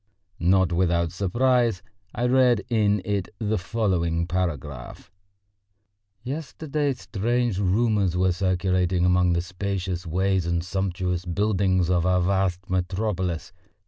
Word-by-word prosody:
Not 90 0 +3
without 85 -2 +1
surprise 115 +2 +1 0.3
I 120 - 0
read 125 -4 +3
in 105 -4 +2
it 100 -2 -2
the 110 -1 -1
following 90 -4 0
paragraph: 75 -8 -4 1.1
"Yesterday 145 +1 -2
strange 120 -2 -1
rumours 100 -2 +1
were 95 0 +3
circulating 90 -1 +1
among 90 -1 +3
the 85 0 0
spacious 90 -1 -4
ways 95 +1 0
and 85 -1 0
sumptuous 90 -1 -2
buildings 95 -1 +1
of 90 -1 +2
our 90 0 +3
vast 95 0 0
metropolis. 90 -1 -2
95 Hz, 110 wpm, -25 LUFS, 90-105 Hz, 1.1 s, Not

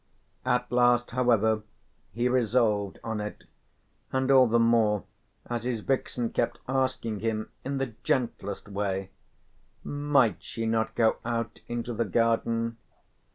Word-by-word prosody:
At 125 -1 +1
last 120 0 +3
however 115 -3 +3 0.5
he 120 +2 0
resolved 115 -5 +2
on 110 -1 -3
it, 105 0 -6 0.7
and 130 +1 +1
all 130 -2 +7
the 115 +1 +3
more 115 -3 +3 0.4
as 120 -1 -3
his 120 -3 -2
vixen 125 -1 -1
kept 120 - 0
asking 130 -5 -1
him 110 0 -2
in 140 +1 -2
the 135 -4 -2
gentlest 115 -7 -1
way: 95 -1 -2 0.7
"Might 145 -7 +2
she 115 - -4
not 110 0 0
go 115 -2 +3
out 115 -1 -3
into 120 0 -3
the 115 +1 0
garden?" 115 +2 +1
115 Hz, 130 wpm, -28 LUFS, 110-125 Hz, 0.7 s, all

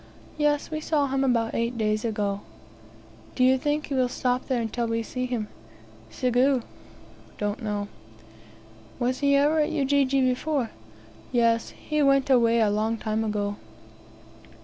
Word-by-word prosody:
"Yes, 295 0 0
we 310 - -2
saw 305 -2 +1
him 270 0 0
about 235 -3 +1
eight 235 +1 -1
days 215 -1 0
ago." 205 -3 -1 0.9
"Do 255 - +2
you 260 +1 +6
think 295 +2 -1
he 285 - -5
will 255 -2 +2
stop 250 0 -1
there 260 -3 0
until 230 +1 -2
we 230 0 -1
see 255 +3 -4
him?" 235 -4 -3 0.6
"Sigue" 255 0 +2 0.7
(don't 205 +3 -2
know). 205 -2 -2 1.1
"Was 255 +1 -1
he 280 -1 +3
ever 295 +3 +3
at 300 - +2
Ujiji 275 -1 +2
before?" 255 0 0 0.6
"Yes, 230 -2 +2 0.2
he 300 0 +1
went 275 -1 +3
away 235 -2 +4
a 210 -2 +3
long 220 +2 0
time 220 0 -2
ago." 205 -1 -2
250 Hz, 150 wpm, -26 LUFS, 225-275 Hz, 1.1 s, you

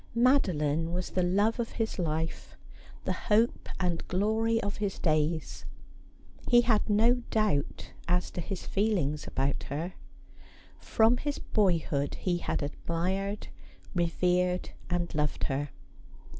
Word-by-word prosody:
Madoline 170 - +2
was 180 0 -3
the 185 - +1
love 205 +6 +2
of 230 - -2
his 220 -3 -2
life, 160 -1 -2 0.5
the - - +1
hope 225 +3 +1
and 175 -3 -1
glory 220 +4 +1
of 200 0 -2
his 205 -2 -2
days. 155 0 0 0.8
He 240 -1 +7
had 230 -3 +2
no 230 +4 +4
doubt 210 -10 0 0.2
as 180 +1 +1
to 175 - -4
his 185 +3 -5
feelings 185 -8 0
about 135 +1 -1
her. 160 +6 -3 0.9
From 225 +2 +3
his 290 +2 -2
boyhood 165 -8 +1
he 175 -2 -1
had 160 - -2
admired, 185 +7 -2 0.4
revered, 180 +1 +1 0.2
and 175 -1 -1
loved 150 -1 -1
her. 140 +2 -1
180 Hz, 125 wpm, -29 LUFS, 165-215 Hz, 0.9 s, He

